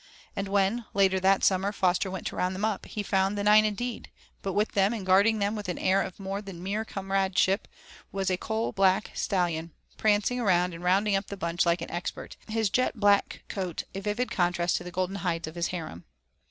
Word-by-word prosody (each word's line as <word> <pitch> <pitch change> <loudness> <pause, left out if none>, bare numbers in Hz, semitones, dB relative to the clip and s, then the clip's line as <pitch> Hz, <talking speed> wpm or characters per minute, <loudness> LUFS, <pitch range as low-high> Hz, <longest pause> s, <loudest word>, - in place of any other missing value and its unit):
And 200 0 -2
when, 200 +4 +1
later 190 -1 +3
that 195 +1 +3
summer 195 +1 +2
Foster 185 -1 +1
went 190 0 -6
to - - -3
round 185 +1 -1
them 200 +3 -1
up, 215 -3 -2
he 210 - -4
found 195 0 +1
the 200 - -1
nine 210 +1 +6
indeed, 230 +3 -3 0.3
but 195 - -3
with 210 +3 +1
them 200 +2 +2
and 210 -5 -5
guarding 200 +4 +4
them 205 +1 0
with 205 -3 -5
an 180 - -2
air 190 +1 +2
of 190 0 -6
more 195 +1 -4
than 190 -4 -9
mere 205 +3 -1
comradeship 195 -1 0 0.4
was 195 -1 -1
a - - +2
coal 220 +4 -2
black 195 +1 +2
stallion, 170 -4 -1 0.2
prancing 215 +3 +2
around 180 -5 +2
and 165 +1 -9
rounding 195 +3 +3
up 195 - -1
the 200 - -6
bunch 170 +1 0
like 170 +1 +2
an - - -7
expert, 175 +1 -5
his 220 -2 0
jet 255 -1 +1
black 205 -1 +2
coat 185 -4 -4
a 195 - -4
vivid 210 +5 -2
contrast 175 -1 +1
to - - -6
the 180 - -7
golden 185 +2 -2
hides 170 -3 -2
of 155 - -7
his 170 0 -1
harem. 160 - -6
195 Hz, 215 wpm, -28 LUFS, 180-205 Hz, 0.4 s, nine